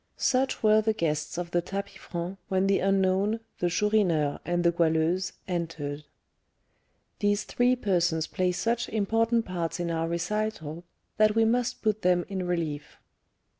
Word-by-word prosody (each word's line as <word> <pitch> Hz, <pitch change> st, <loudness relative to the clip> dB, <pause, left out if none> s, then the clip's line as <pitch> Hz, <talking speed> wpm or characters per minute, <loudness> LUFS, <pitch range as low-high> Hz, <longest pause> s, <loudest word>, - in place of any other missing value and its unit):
Such 260 Hz, -1 st, +1 dB
were 215 Hz, 0 st, +5 dB
the 220 Hz, 0 st, +1 dB
guests 155 Hz, -5 st, -2 dB
of 175 Hz, -1 st, -4 dB
the 175 Hz, -, +2 dB
tapis 195 Hz, +3 st, -5 dB
franc 175 Hz, +2 st, -6 dB
when 190 Hz, 0 st, +1 dB
the 195 Hz, 0 st, +3 dB
unknown, 195 Hz, +3 st, +2 dB, 0.2 s
the 175 Hz, -, +1 dB
Chourineur, 175 Hz, -7 st, +1 dB
and 175 Hz, 0 st, 0 dB
the 170 Hz, -, +4 dB
Goualeuse 170 Hz, +2 st, +1 dB
entered. 160 Hz, -5 st, -4 dB, 1.1 s
These 205 Hz, 0 st, +1 dB
three 245 Hz, +1 st, +2 dB
persons 175 Hz, -8 st, +1 dB
play 185 Hz, -1 st, 0 dB
such 230 Hz, +6 st, -1 dB
important 225 Hz, +2 st, +1 dB
parts 175 Hz, -2 st, -3 dB
in 170 Hz, -1 st, -1 dB
our 165 Hz, 0 st, -1 dB
recital, 170 Hz, -2 st, -3 dB, 0.3 s
that 215 Hz, 0 st, +4 dB
we 225 Hz, 0 st, +4 dB
must 240 Hz, +2 st, 0 dB
put 215 Hz, -1 st, +1 dB
them 180 Hz, -1 st, +2 dB
in 190 Hz, -2 st, -3 dB
relief. 160 Hz, -4 st, -3 dB
185 Hz, 150 wpm, -27 LUFS, 170-215 Hz, 1.1 s, were